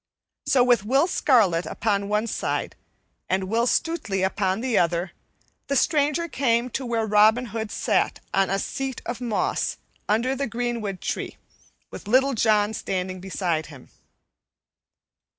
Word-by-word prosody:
So, 255 -2 +4
with 245 -5 +3
Will 270 +8 +3
Scarlet 220 - +2
upon 200 -2 -1
one 210 +1 +1
side 230 - -3 0.5
and 190 +1 +1
Will 225 +5 0
Stutely 250 - 0
upon 190 0 0
the 250 -2 -1
other, 175 +1 +1 0.6
the 280 - 0
stranger 300 +3 +2
came 250 -4 0
to 260 +1 -3
where 230 -2 0
Robin 215 +3 +4
Hood 220 -2 -3
sat - - 0
on 195 0 +2
a 195 - +1
seat 270 +5 -4
of 240 0 -5
moss 230 -4 -1 0.3
under 235 +5 +1
the 275 0 -2
greenwood 230 -4 -3
tree, - - -4 0.5
with - - -9
Little 265 +5 +3
John 215 -2 +2
standing 185 -2 -3
beside 175 -4 -2
him. 140 -4 -14
220 Hz, 140 wpm, -24 LUFS, 195-255 Hz, 0.6 s, So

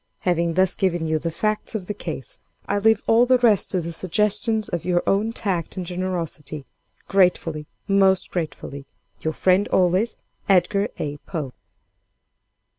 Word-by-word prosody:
"Having 170 -2 0
thus 185 0 +3
given 175 -4 0
you 160 0 0
the 165 - -2
facts 215 +7 -2
of 200 -4 -3
the 210 - -3
case, 160 -9 -6 0.3
I 205 - 0
leave 220 +1 +3
all 235 +2 +4
the 255 0 +5
rest 230 -5 +3
to 185 - 0
the 170 +1 -5
suggestions 210 +4 +1
of 175 -2 -3
your 175 -1 +1
own 210 +3 +1
tact 190 -6 -2
and 185 - -3
generosity. 170 -5 -4 0.4
Gratefully, 175 -5 +1 0.2
most 195 -2 +3
gratefully, 140 -5 -5 0.3
"Your 160 - -2
friend 185 +4 +2
always, 185 +5 +2 0.3
"EDGAR 195 +2 +3
A. 145 0 -4
POE." 145 -4 -6
185 Hz, 150 wpm, -23 LUFS, 165-205 Hz, 0.4 s, the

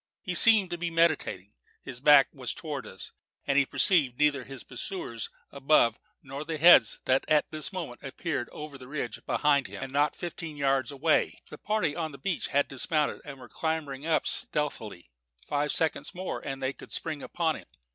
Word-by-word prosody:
He 180 - -3
seemed 205 -1 +8
to 175 - -4
be 170 0 -2
meditating. 160 - 0 0.3
His 125 -2 -8
back 140 0 +7
was 130 -3 -5
towards 145 -5 -6
us, 95 - -9 0.3
and 140 - 0
he 140 -1 +3
perceived 145 -10 +3
neither 145 -2 +2
his 135 -2 -9
pursuers 125 - -4 0.2
above 135 -5 +2 0.2
nor 135 +1 -7
the 160 0 -4
heads 150 -8 +7
that 130 +1 +2
at 155 -1 +2
this 155 -3 -3
moment 165 -10 -6
appeared 140 -1 -4
over 150 -2 -9
the 130 - -11
ridge 130 -5 -5
behind 145 -2 +2
him, - - -8
and 135 0 -7
not 145 +2 +1
fifteen 165 -3 -6
yards 135 -3 +1
away. 145 +3 +1
The - - -10
party 210 -8 -1
on 160 -3 -4
the - - -9
beach 195 0 -2
had 145 0 +1
dismounted 150 +3 -1
and 140 -2 -9
were - - -12
clambering 155 -3 -4
up 160 - +1
stealthily. 110 - -3 0.4
Five 145 0 0
seconds 150 -2 -1
more 185 +1 -4
and 135 -1 -6
they 130 +1 -1
could - - -14
spring 155 -3 -3
upon 160 0 -1
him. - - -13
145 Hz, 185 wpm, -28 LUFS, 135-160 Hz, 0.4 s, seemed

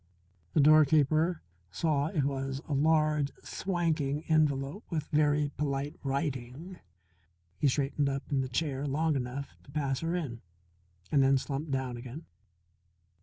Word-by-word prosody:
The - - +3
doorkeeper 155 +2 +4 0.3
saw 145 - 0
it 155 -3 0
was 135 -1 -2
a 150 - -2
large, 155 0 +2
swanking 160 -6 -1
envelope 150 +3 +1
with 155 -4 -2
very 150 -1 +2
polite 140 0 -2
writing. 140 +4 -3 0.8
He 145 - +3
straightened 140 +1 +1
up 135 0 -3
in 135 -2 +2
the 130 - -3
chair 140 +1 -1
long 155 +3 +1
enough 130 +2 -3
to - - -19
pass 140 -2 -1
her 165 +1 -1
in, 135 -10 -4 0.7
and 140 - +4
then 135 0 +5
slumped 140 +3 -4
down 130 -3 -2
again. 130 +6 -8
145 Hz, 135 wpm, -30 LUFS, 135-155 Hz, 0.8 s, then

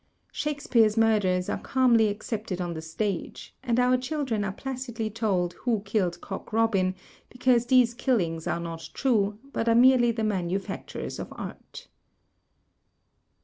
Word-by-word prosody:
Shakespeare's 240 -7 +1
murders 205 -5 +2
are - - -2
calmly 240 -4 +3
accepted 205 -2 -4
on 175 -1 -2
the 160 - -6
stage, 175 +4 -4
and 245 -2 0
our 250 0 +4
children 255 -5 -2
are 195 - -2
placidly 240 -1 -5
told 195 -6 0
Who 230 -5 0
Killed 185 -4 0
Cock 195 - -7
Robin 205 -5 +2 0.3
because 250 -1 +2
these 245 -2 +4
killings 180 - 0
are - - -1
not 165 -1 -6
true, 210 -6 +1 0.2
but 230 - 0
are 230 - +4
merely 245 0 +6
the 225 -1 -3
manu 190 -4 0
factures 195 - -6
of - - -6
art. - - -9
220 Hz, 145 wpm, -27 LUFS, 185-245 Hz, 0.3 s, merely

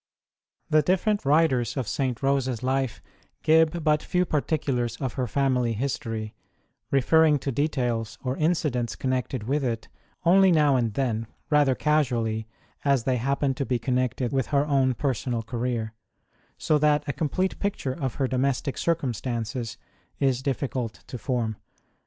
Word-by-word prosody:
The 155 0 +4
different 190 +4 +1
writers 135 -5 +2
of 130 -5 -2
St. 130 0 -2
Rose 135 -1 +2
s 125 -2 -3
life 130 -2 -1 0.4
give 160 +1 +4
but 150 -1 +3
few 180 0 0
particulars 140 -6 -1
of 130 -4 -4
her 130 -2 -2
family 125 -2 +1
history, 115 -3 -3 0.6
referring 150 +3 +4
to 140 - -3
details 120 -5 -1
or 130 0 -1
incidents 150 -7 0
connected 130 -2 -2
with 140 +6 0
it 115 -3 -2 0.4
only 190 +2 +6
now 150 -4 +4
and 115 -4 0
then, 115 -4 -1 0.2
rather 145 -3 +4
casually, 120 -8 0 0.4
as 140 -4 +2
they 130 0 +1
happen 140 +3 0
to 135 - -2
be 130 -2 0
connected 125 0 -1
with 135 -4 0
her 140 -1 +2
own 135 -3 +2
personal 125 -4 -1
career, 115 -1 -3 0.6
so 150 - +2
that 150 0 +3
a 145 - -1
complete 185 +5 -1
picture 200 -10 -2
of 135 -4 -3
her 135 - 0
domestic 135 +1 -1
circumstances 120 -6 -2 0.4
is 130 -2 +1
difficult 130 -4 -3
to 125 - -7
form. 115 -2 -1
130 Hz, 145 wpm, -26 LUFS, 120-150 Hz, 0.6 s, only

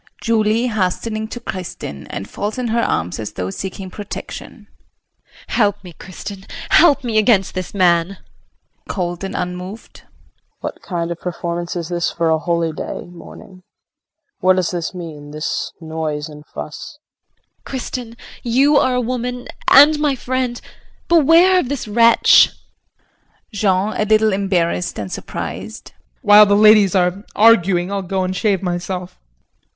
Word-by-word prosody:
] - - -30
JULIE 225 0 +2
[Hastening 215 0 -2
to 240 - -7
Kristin 180 - -7
and 95 - -6
falls 210 +3 -4
in 250 -2 -2
her 235 +1 +1
arms 85 - -1
as 105 - -5
though 95 0 -4
seeking 190 - -6
protection]. 205 +1 -8 0.8
Help 205 -4 +1
me, 180 -2 -11
Kristin, 190 +3 -9 0.2
help 305 -5 +5
me 225 -3 +1
against 210 -3 +3
this 185 +1 -5
man. 180 0 +2
KRISTIN - - -28 0.6
[Cold 175 -2 -3
and 195 - -5
unmoved]. 180 +4 -6 0.6
What - - -6
kind 170 -2 -3
of 170 - -5
performance 175 0 -4
is 170 -1 -4
this 175 -1 -1
for 165 -1 0
a 160 - +2
holy 170 0 -1
day 155 - -6
morning? 185 +2 -13 0.8
What 185 0 +4
does 185 -2 0
this 175 0 -4
mean 155 -4 -8
this 150 +1 -3
noise 160 -2 -4
and 150 -1 -12
fuss? 155 - -8 0.4
JULIE. - - -46
Kristin, 245 -3 -6 0.2
you 270 +5 +3
are 255 -2 +2
a - - +1
woman, 250 0 -4 0.2
and 295 +2 +7
my 295 -2 +1
friend. 255 -1 -2 0.5
Beware 340 +3 +5
of 260 - -2
this 280 -5 -4
wretch. 230 +2 +6 1.0
JEAN 200 0 +1
[A 215 - +1
little 215 0 +3
embarrassed 180 -3 -1
and 100 -3 -5
surprised]. - - -6 0.3
While 210 0 +8
the 200 - +4
ladies 210 -2 +6
are 180 +2 +1
arguing 195 -4 +4
I'll 200 -1 -1
go 190 0 -2
and 185 0 -2
shave 195 -1 0
myself. 180 0 -4
195 Hz, 150 wpm, -19 LUFS, 175-230 Hz, 1.0 s, While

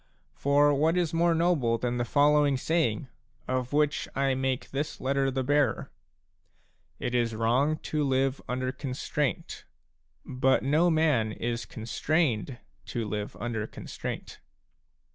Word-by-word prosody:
For 145 +1 +3
what 160 +5 +2
is 175 -3 0
more 170 0 +3
noble 160 -9 +2
than 125 +1 -2
the 120 - 0
following 145 +1 +3
saying/* 140 -5 0 0.4
of 130 -1 -1
which 150 0 +1
I 135 0 +2
make 130 -1 -2
this 145 +2 -3
letter 135 +1 +1
the 130 0 -1
bearer: 145 -3 +1 1.1
"It 120 - -3
is 120 -2 +1
wrong 125 +7 +2
to 150 -1 -1
live 135 0 +1
under 130 +1 -1
constraint; 130 - -3 0.6
but 130 0 +2
no 155 +6 +3
man 150 -9 +2
is 115 +1 -3
constrained 125 +1 -1 0.3
to 115 -2 -3
live 105 0 -4
under 115 -3 -3
constraint." - - -7
135 Hz, 130 wpm, -28 LUFS, 120-150 Hz, 1.1 s, For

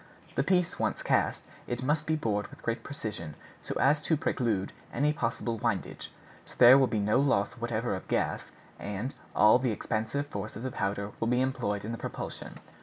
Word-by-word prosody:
The - - +1
piece 180 +3 +1
once - - -1
cast, - - +1 0.2
it 120 +1 -3
must 150 +3 0
be 160 - +2
bored 105 -8 -1
with - - -15
great 115 0 -1
precision, 105 - -6 0.3
so - - -5
as 150 +2 +4
to 160 - +1
preclude 110 -9 0 0.2
any 150 +1 +2
possible 115 -4 -2
windage. 115 -4 -2 0.3
So - - -14
there 125 +1 +10
will 135 - +4
be 115 - -1
no 105 +4 +3
loss 120 -8 +2
whatever 120 -2 -2
of 95 - -5
gas, - - -1 0.3
and 105 +6 -4 0.2
all 105 +3 +7
the 130 -1 0
expansive 110 +5 -2
force 100 -9 -6
of 110 - -6
the 130 - -2
powder 100 -1 -2
will 115 - 0
be 125 +1 +2
employed 120 -6 -1
in 110 - -3
the 115 - -5
propulsion." - - -6
115 Hz, 190 wpm, -29 LUFS, 105-135 Hz, 0.3 s, there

